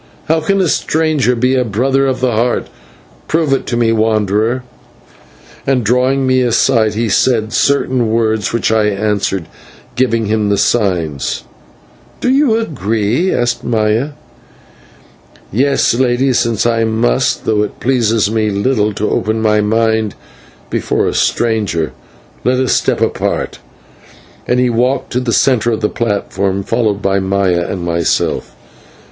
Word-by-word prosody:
How 160 +1 +1
can 195 +5 +1
a 185 - +2
stranger 155 -5 +1
be 125 +2 +1
a 130 -1 +2
Brother 130 +5 +1
of 130 -1 -2
the 130 -1 +1
Heart? 120 +2 0 0.6
Prove 155 -3 +1
it 135 - -1
to 120 - -1
me, 115 -1 +2
wanderer." 110 +2 +1 1.0
And, 130 -3 +2
drawing 130 +4 +1
me 130 0 +2
aside, 115 -2 +2
he 115 +1 0
said 110 0 +1
certain 130 -4 +1
words, 110 -2 0
which 115 -1 0
I 110 -1 +2
answered, 100 -3 -1 0.5
giving 115 -3 +1
him 105 0 0
the 100 - +1
signs. 90 - 0 0.8
"Do 250 - +1
you 265 -4 +3
agree?" 115 - -1
asked 120 0 -1
Maya. 115 +5 0 1.4
"Yes, 135 +5 +2
Lady, 130 +2 +1
since 115 -3 0
I 115 -1 +2
must, 110 - 0
though 105 -1 +1
it 105 - -4
pleases 115 -5 +1
me 110 -1 0
little 105 +1 0
to 105 - -1
open 110 +1 -1
my 105 -1 +2
mind 110 0 0 0.6
before - - 0
a - - -1
stranger. 105 -9 0 0.5
Let 125 0 +1
us 130 -1 +1
step - - 0
apart" - - -1 0.9
and 125 - +2
he 125 - +3
walked 125 +3 0
to 125 - 0
the 125 -2 -2
centre 120 +1 +2
of 110 - -2
the 105 - +1
platform, 100 -3 -2
followed 105 -1 -1
by 100 0 +1
Maya 95 -3 0
and 90 -2 -4
myself. 85 -1 -1
115 Hz, 145 wpm, -15 LUFS, 105-130 Hz, 1.4 s, you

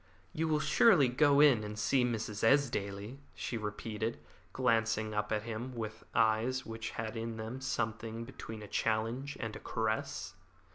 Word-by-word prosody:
"You 160 +1 0
will 155 -1 +2
surely 160 - +5
go 140 +3 +5
in 135 -8 +6
and 105 0 -6
see 125 +4 +2
Mrs. 110 -3 -2
Esdaile," 115 -3 +1 0.2
she - - -4
repeated, 110 +1 -3 0.3
glancing 115 -3 +1
up 105 0 -1
at 105 -1 0
him 120 +3 -5
with 110 -1 -5
eyes 115 +4 +2
which 115 0 -5
had 110 0 -3
in 115 0 -4
them 110 +4 -5
something 115 -2 -2
between 110 -4 -8
a - - -8
challenge 115 +7 -1
and 110 -1 -4
a - - -7
caress. 110 -1 -2
115 Hz, 155 wpm, -33 LUFS, 110-125 Hz, 0.3 s, in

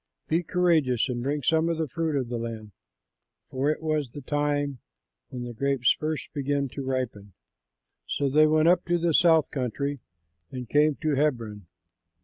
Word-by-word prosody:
Be 165 +2 +1
courageous 165 -9 +2
and 120 -1 -2
bring 140 +3 -2
some 160 +4 +2
of 165 - -1
the 160 -1 -1
fruit 160 +3 -2
of 130 -3 -1
the 120 0 -3
land," 115 -2 -6 0.8
for 135 +3 0
it 155 +1 -2
was 155 -4 -1
the 145 - -9
time 145 -1 -1 0.5
when 125 -1 -6
the 120 0 -6
grapes 135 +1 +2
first 155 0 -3
begin 140 -1 -1
to 140 - -6
ripen. 125 -7 -4 0.7
So 140 - 0
they 155 +3 +5
went 155 +1 +3
up 180 +1 +4
to 175 0 +1
the 170 -1 0
South 160 -1 +4
Country 140 +2 -2 0.5
and 125 +1 -7
came 150 +2 +3
to 155 -1 +1
Hebron. 115 - -1
145 Hz, 170 wpm, -26 LUFS, 125-155 Hz, 0.8 s, they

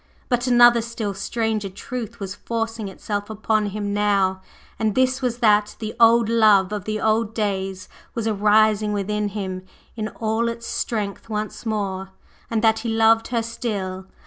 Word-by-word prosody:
But 245 0 +1
another 240 -1 +6
still 225 -3 -4
stranger 215 0 -2
truth 235 +3 -7
was 195 -2 -4
forcing 225 -1 -3
itself 205 +2 -4
upon 215 0 0
him 205 0 -3
now; 200 -2 +1 0.4
and 220 -2 0
this 260 +1 +2
was, 245 -2 -1
that 210 -2 +3
the 215 -1 -5
old 230 0 +6
love 215 -4 +4
of 205 -2 -4
the 215 0 -2
old 220 0 +3
old 220 - -20
days 190 -3 -2 0.3
was 230 -2 -2
arising 215 0 +3
within 210 +1 -1
him 190 -2 -4 0.3
in 215 -2 -3
all 225 +1 -1
its 230 0 -6
strength 210 -1 -3
once 215 +2 -4
more, 195 -3 -2 0.4
and 225 -1 -1
that 220 0 +4
he 230 +1 -3
loved 225 0 +4
her 235 -2 -1
still! 195 -5 -4
215 Hz, 165 wpm, -22 LUFS, 205-230 Hz, 0.4 s, another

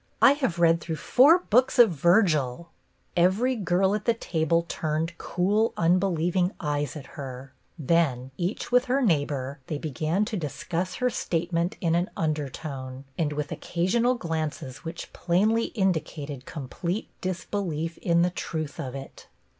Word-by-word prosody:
I 275 - +8
have 265 - 0
read 170 -1 +4
through 165 - -3
four 275 - +6
books 250 +5 +4
of 235 -5 +7
Virgil." 170 - +2 0.5
Every 195 +9 +3
girl 190 -1 +1
at 210 0 -2
the 235 - +3
table 165 -4 0
turned 160 +2 -2
cool, 205 +5 +1
unbe 175 +3 +3
lieving 175 +3 +1
eyes 145 -1 -2
at 145 -3 -7
her; 130 -1 -8 0.2
then, 140 -5 +1
each 180 - -3
with 250 +1 +4
her 265 +1 +1
neighbor, 145 - 0
they 150 - -2
began 155 +7 -1
to 220 - -4
discuss 175 +3 -3
her 250 0 0
state 170 -5 -2
ment 170 +2 0
in 165 -2 +1
an 175 +2 +1
undertone, 140 -3 -4
and 150 -1 0
with 150 -1 -3
occasional 230 +9 +1
glances 155 - -4
which 170 0 -8
plainly 215 +6 +2
indicated 155 - -2
complete 170 - -4
disbelief 175 -3 -3
in 170 -1 +3
the 180 - +1
truth 155 -4 -4
of 130 0 -4
it. 135 0 -9
170 Hz, 150 wpm, -26 LUFS, 150-190 Hz, 0.5 s, I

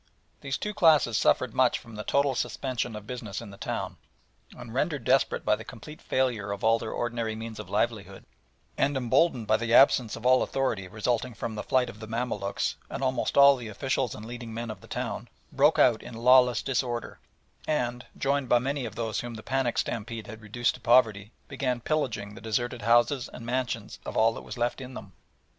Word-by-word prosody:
These 135 -1 -3
two 210 - -4
classes 155 - +4
suffered 120 +2 +2
much 130 -1 +3
from 115 -2 -13
the 105 - -5
total 140 +2 +2
suspension 125 -2 -2
of 105 -1 -8
business 110 -5 -5
in 115 -4 -9
the - - -11
town, - - -4 0.6
and - - -9
rendered - - -1
desperate - - +2
by - - +4
the - - -9
complete 150 +8 -11
failure 120 -6 0
of 100 0 -5
all 115 +1 +4
their 110 - -5
ordinary 115 -2 -2
means 110 0 -7
of - - -8
livelihood, - - -2 0.5
and 140 0 +2
emboldened 125 0 +2
by 110 +1 +3
the 115 +1 +1
absence 125 -5 +5
of 115 +1 -10
all 130 0 +5
authority 115 -8 -1
resulting 115 +4 -2
from 110 - -4
the 105 - -4
flight 130 +2 +1
of 110 -2 -10
the 110 - -8
Mamaluks 110 -4 -2
and - - -4
almost 130 0 0
all 140 0 +8
the 120 -3 -7
officials 130 +3 -1
and 110 - -9
leading 120 0 -7
men 115 0 -4
of 100 -3 -10
the - - -14
town, - - -4 0.2
broke - - +4
out - - +4
in 120 - -9
lawless 125 -1 +5
disorder, 125 -3 -2 0.5
and, 125 -5 -1
joined 140 -2 0
by 120 - +6
many 135 +2 -2
of 110 -2 -7
those 110 -2 -2
whom 120 -1 -6
the 110 - -9
panic 135 -3 0
stampede 115 -1 -3
had 110 0 -10
reduced 120 +3 0
to - - -12
poverty, 115 -4 +3 0.2
began 125 -3 -2
pillaging 115 -8 -2
the - - -11
deserted 120 +2 -2
houses 120 +4 +3
and 115 - -9
mansions 120 -3 -3
of - - -5
all 115 +1 +4
that - - -8
was 110 - -8
left 120 +2 -1
in 130 0 -8
them. 100 -6 -9
120 Hz, 205 wpm, -28 LUFS, 110-130 Hz, 0.6 s, all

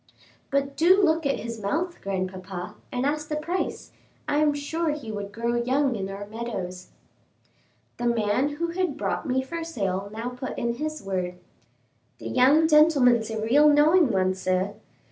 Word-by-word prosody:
"But 275 0 0
do 360 +5 +5
look 320 -5 +2
at 275 - 0
his 230 -1 -6
mouth, 335 - -2
grandpapa, 185 -1 -4 0.2
and 250 +1 -1
ask 300 +1 -1
the 300 - -1
price; 340 +5 -3 0.4
I 290 - +1
am 300 0 +4
sure 320 +3 -2
he 290 -7 -4
would 205 -1 -5
grow 235 +3 -2
young 265 +1 +1
in 195 -2 -4
our 200 +1 -6
meadows." 205 -5 -6 1.1
The 240 - -1
man 235 +5 +1
who 335 +2 -2
had 360 +1 -2
brought - - -2
me 260 0 +1
for 335 +5 -5
sale 200 - -3
now 225 +3 -4
put 250 +1 -6
in 235 0 -1
his 310 +1 -4
word. 185 -2 -2 0.8
"The - - -7
young 285 +6 +5
gentleman's 280 -8 +5
a 220 -1 -3
real 290 +7 +5
knowing 300 +2 +5
one, 185 -3 +2
sir. 185 +1 -1
250 Hz, 165 wpm, -25 LUFS, 205-300 Hz, 1.1 s, do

